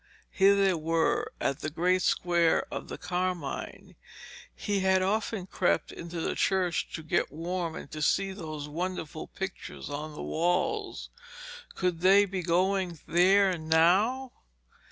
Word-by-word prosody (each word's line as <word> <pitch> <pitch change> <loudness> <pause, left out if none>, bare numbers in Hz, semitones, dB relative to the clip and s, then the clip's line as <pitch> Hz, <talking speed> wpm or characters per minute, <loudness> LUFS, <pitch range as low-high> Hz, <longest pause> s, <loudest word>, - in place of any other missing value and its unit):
here 195 +1 +5
they 195 -1 +3
were 165 0 0
at 140 - -1
the 155 - -3
great 180 +4 +1
square 170 -2 +2
of - - -5
the - - -6
Carmine. 180 -5 -4 0.6
He 205 -1 -1
had 190 0 +3
often 205 0 -1
crept 185 -1 0
into 170 0 -6
the - - -1
church 185 -3 0
to 160 - -7
get 160 +3 0
warm 170 +1 -3
and - - -9
to 155 - -6
see 195 +5 +2
those 155 -6 -6
wonderful 160 0 -4
pictures 190 -5 -7
on 150 +1 -5
the - - -6
walls. 180 - -1 0.6
Could 180 -3 -1
they 195 +2 +6
be 190 -1 -4
going 180 +1 +1
there 190 +2 +4
now? 185 +12 +3
180 Hz, 140 wpm, -29 LUFS, 165-190 Hz, 0.6 s, they